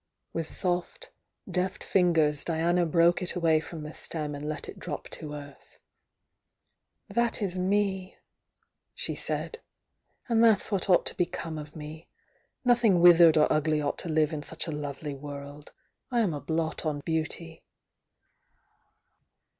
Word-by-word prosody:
With 165 -1 -2
soft, 180 - -2 0.4
deft 185 0 -2
fingers 160 -5 +2
Diana 170 +1 +1
broke 170 +2 +4
it 180 - -1
away 165 -3 +3
from 160 0 -8
the 150 +1 -7
stem 150 -3 -3
and 145 +1 -5
let 155 - -4
it - - -9
drop - - -5
to 150 -1 -7
earth. 145 -1 -12 1.3
"That 235 -1 0
is 195 -4 -2
me!" 190 0 0 0.8
she - - -1
said. 460 - -3 0.7
"And 230 -2 +3
that's 225 -2 +4
what 195 -1 0
ought 180 - +5
to - - +1
become 165 -2 -2
of 150 0 -10
me! 155 +1 -9 0.6
Nothing 235 -7 +4
withered 170 -2 +8
or 150 - +6
ugly 155 0 +1
ought 145 -1 -2
to 175 - -3
live 155 0 +2
in 150 - -3
such 160 +2 -3
a 165 - -4
lovely 145 0 -5
world. 145 +1 -9 0.4
I 240 -2 +2
am 195 -7 +1
a 145 - -5
blot 160 +2 -2
on 150 -3 -2
beauty." 160 +1 -3
165 Hz, 145 wpm, -28 LUFS, 150-180 Hz, 1.3 s, withered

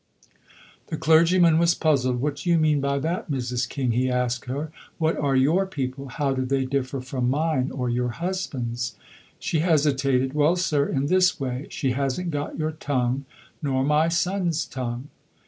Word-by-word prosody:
The 160 - -4
clergyman 165 +1 +5
was 170 0 +3
puzzled. 130 -5 +1
"What 145 +1 -1
do 175 - -4
you 170 - +5
mean 155 -2 +2
by 140 0 0
that, 165 +5 -2
Mrs. 125 -2 -2
King?" 130 -3 -1
he 125 +3 +1
asked 125 -1 -1
her. 145 +5 -4 0.3
"What 160 0 +1
are 140 -2 0
your 160 +9 +3
people? 135 -5 -4
How 135 +2 -1
do 130 0 -1
they 135 +1 0
differ 135 0 -2
from 125 -1 -2
mine, 145 -1 +1
or 125 -2 -3
your 125 +1 0
husband's?" 125 - -3 0.4
She 160 - -1
hesitated. 140 -5 +2
"Well, 150 +3 +3
sir, 150 -6 +1
in 135 0 -1
this 185 +3 +3
way. 130 0 -3
She 135 - -1
hasn't 140 +7 -1
got 145 -1 -4
your 155 0 -1
tongue, 135 -3 -1 0.4
nor 135 -3 0
my 150 +3 +3
son's 175 -1 0
tongue." 125 +1 -5
140 Hz, 170 wpm, -24 LUFS, 130-160 Hz, 0.4 s, clergyman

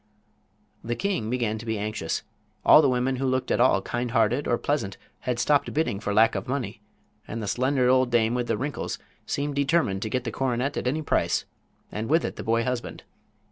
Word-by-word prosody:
The 120 +1 -2
king 180 - -1
began 115 -3 -1
to 115 - -9
be 110 -1 -1
anxious. 105 -5 -3 0.4
All - - +9
the 140 - +3
women 130 +1 0
who 135 +1 -1
looked 130 0 0
at - - +2
all 120 -6 +4
kind 120 0 -2
hearted 115 +4 +2
or 120 - +2
pleasant 140 -10 -2 0.2
had 125 -1 -2
stopped 145 +4 +2
bidding 150 -10 0
for 105 -1 -3
lack 110 +3 +5
of - - -4
money, 125 -5 -3 0.5
and 115 - -5
the 105 - -4
slender 130 +4 +1
old 130 0 +4
dame 115 -1 +2
with 125 -1 -1
the - - 0
wrinkles 140 +6 -3 0.3
seemed 145 +1 -1
determined 140 - +1
to 110 - -2
get 125 +2 -1
the 120 - -3
coronet 130 +1 -1
at - - -2
any 155 +5 0
price, - - +1 0.5
and 110 +3 -4
with 160 +3 +3
it - - -4
the - - -6
boy 115 +1 +1
husband. 125 -1 -4
125 Hz, 210 wpm, -26 LUFS, 110-135 Hz, 0.5 s, All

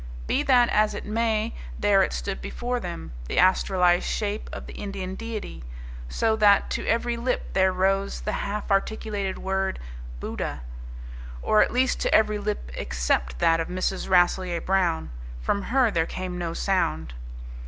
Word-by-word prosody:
Be - - +1
that 245 -2 +5
as 215 0 +2
it - - -6
may, 220 0 0 0.2
there - - +4
it - - +1
stood - - -4
before 245 - -3
them, 175 - -6 0.2
the - - -3
astralized 180 -1 +4
shape 210 0 -2
of - - -7
the - - -9
Indian 195 -2 -5
deity, 215 - -6 0.5
so 220 - +1
that 205 -2 +4
to - - -2
every 235 +1 +1
lip 250 +2 -2
there 190 0 +4
rose 195 +2 0
the 210 - -2
half 205 0 -3
articulated 200 -1 -1
word, 190 0 -1 0.4
"Buddha"; 65 +2 -4 0.8
or 215 - +4
at - - +3
least 255 +1 +1
to - - 0
every 215 -1 +3
lip 205 - -3
except 60 0 -1
that 165 - +3
of 165 - -1
Mrs. 185 +1 -2
Rasselyer 180 -1 +3
Brown. 180 - 0 0.3
From 200 - 0
her 250 +1 +2
there 165 -2 +1
came 185 -1 -5
no 170 -2 -3
sound. 80 - 0
195 Hz, 160 wpm, -25 LUFS, 175-215 Hz, 0.8 s, that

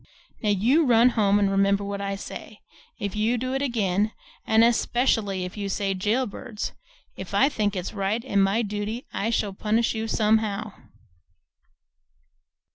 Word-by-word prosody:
"Now 210 - 0
you 235 - +3
run 235 0 +6
home 205 -4 +2
and 200 -1 +2
remember 195 +1 +2
what 200 0 -4
I 200 0 -2
say. 205 +2 -9 0.4
If 200 0 -4
you 220 +3 +1
do 255 +2 -3
it 270 - -1
again, 215 -5 0 0.3
and 220 +1 +5
especially 230 -4 +1
if 180 - -8
you 200 -1 -3
say 195 0 -1
'Jail 215 +7 0
Birds,' 210 0 -6 0.4
if - - -7
I 275 - +5
think 210 -7 -1
it's 180 -1 -4
right 210 +4 -2
and 200 -6 +2
my 200 +5 +1
duty, 210 +3 -4
I 220 - -1
shall 210 -3 -1
punish 220 +4 0
you 225 0 -3
somehow." 215 -1 +1
210 Hz, 160 wpm, -25 LUFS, 200-230 Hz, 0.4 s, run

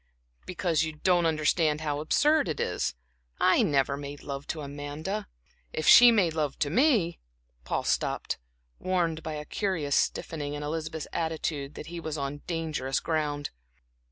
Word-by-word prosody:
"Because 170 -3 0
you 160 -1 -1
don't 175 +2 +2
understand 155 0 +2
how 145 -2 -1
absurd 295 - +3
it 155 - -3
is. - - -1 0.4
I - - +5
never 140 -1 +2
made 140 0 -8
love 140 0 -6
to 155 - -4
Amanda 145 +8 -5 0.5
if 155 - -2
she 245 0 +10
made 190 -8 +3
love 150 -3 -1
to 145 - 0
me" 220 - +3 0.5
Paul - - -1
stopped, - - -1 0.4
warned 170 -4 0
by 160 -1 -5
a 150 0 -5
curious 165 -7 -1
stiffening 145 -2 -1
in 145 - -5
Elizabeth's 155 0 -3
attitude 155 -3 -2
that - - -7
he 170 +1 -6
was 155 -2 -4
on 140 +1 -4
dangerous 155 -6 -1
ground. 150 -3 -2
155 Hz, 155 wpm, -28 LUFS, 145-170 Hz, 0.5 s, she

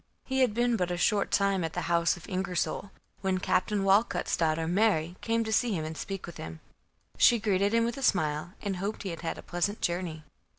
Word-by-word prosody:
He 265 0 -1
had 240 -5 +3
been 240 0 +2
but 180 -3 0
a 175 - -2
short 200 +3 +2
time 195 -2 +2
at 160 - -3
the 180 - -2
house 170 +1 +2
of 175 - -12
Ingersol, 185 0 -2 0.3
when 190 -1 +1
Captain 195 +2 +1
Walcut's 200 +4 +2
daughter 160 0 0
Mary 175 -3 +2
came 230 0 +1
to 220 0 -2
see 235 0 +2
him 160 -4 -2
and 160 +1 -5
speak 195 +3 -5
with 170 - -10
him. 80 0 -7 0.6
She 240 - +6
greeted 200 -2 +1
him 230 0 +3
with 235 +2 -3
a - - -5
smile, 160 - +1
and 200 -3 -2
hoped 200 +4 -3
he 195 - -3
had 165 - -6
had 165 - -3
a - - -9
pleasant 180 +4 -2
journey. 170 -3 -2
190 Hz, 220 wpm, -29 LUFS, 170-215 Hz, 0.6 s, She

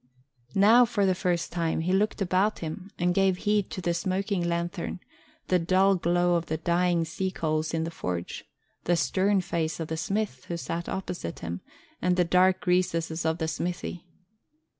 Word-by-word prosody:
Now, 220 +5 +7
for 225 -4 +1
the 190 - +3
first 180 -2 -1
time, 165 -2 -1
he 180 +3 0
looked 205 +1 +1
about 190 +4 +1
him 170 +4 -6
and 175 0 +1
gave 190 -1 +3
heed 210 0 +1
to 185 - -5
the 175 -1 0
smoking 185 +2 -1
lanthorn, 170 +2 -2 0.5
the 180 - +3
dull 185 +3 +3
glow 175 0 +2
of 170 -1 0
the 160 - -1
dying 170 0 +1
sea 185 +4 -2
coals 155 -3 -1
in 165 -1 -1
the 165 - -4
forge, 90 - -4 0.4
the 175 - +3
stern 190 +3 +2
face 160 -3 -2
of 160 - -4
the 160 - -2
smith 195 -5 -2
who 170 - -4
sat 170 +1 -4
opposite 180 - -5
him, 85 +2 -4 0.4
and 180 0 +2
the 180 -1 +3
dark 185 +2 +3
recesses 165 -3 +1
of 160 0 +1
the 160 - -2
smithy. 175 +1 -4
175 Hz, 180 wpm, -27 LUFS, 165-190 Hz, 0.5 s, Now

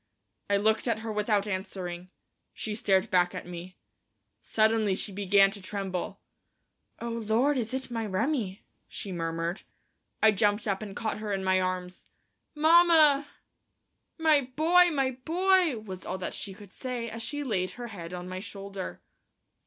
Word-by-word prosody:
I 200 - +4
looked 220 +4 +2
at 225 -2 0
her 225 -1 -4
without 210 -1 +1
answering; 185 -2 -4 0.5
she 215 - -4
stared 195 -1 +1
back 180 -1 +3
at - - -5
me. 180 +1 -8 0.6
Suddenly 220 -2 +2
she 205 - -2
began 195 0 +4
to 200 -1 -8
tremble. 190 -2 -4 0.8
"Oh, 235 - -4
Lord, 230 +5 +1
is 235 -3 -1
it 260 -1 -3
my 225 -2 -2
Remi!" 210 -1 -1 0.2
she 200 - -7
murmured. 165 +1 -2 0.6
I 220 - +8
jumped 205 +2 +1
up 195 0 0
and 200 -2 -7
caught 220 -1 -2
her 215 -1 -4
in 195 -1 -1
my 190 0 +3
arms. 185 0 -3 0.5
"Mamma!" 310 -2 +6 0.9
"My 315 -3 +4
boy! 350 +3 +5
my 270 -5 +1
boy!" 360 -2 +3
was 190 -4 -8
all 190 - -4
that 185 - -4
she 195 -2 -6
could 205 -1 -14
say, 250 -3 -4
as 230 0 -6
she 290 +5 -3
laid 190 -8 -1
her 240 -1 -6
head 175 -5 -8
on 180 0 -6
my 185 0 -5
shoulder. 195 -1 -7
210 Hz, 160 wpm, -28 LUFS, 185-245 Hz, 0.9 s, I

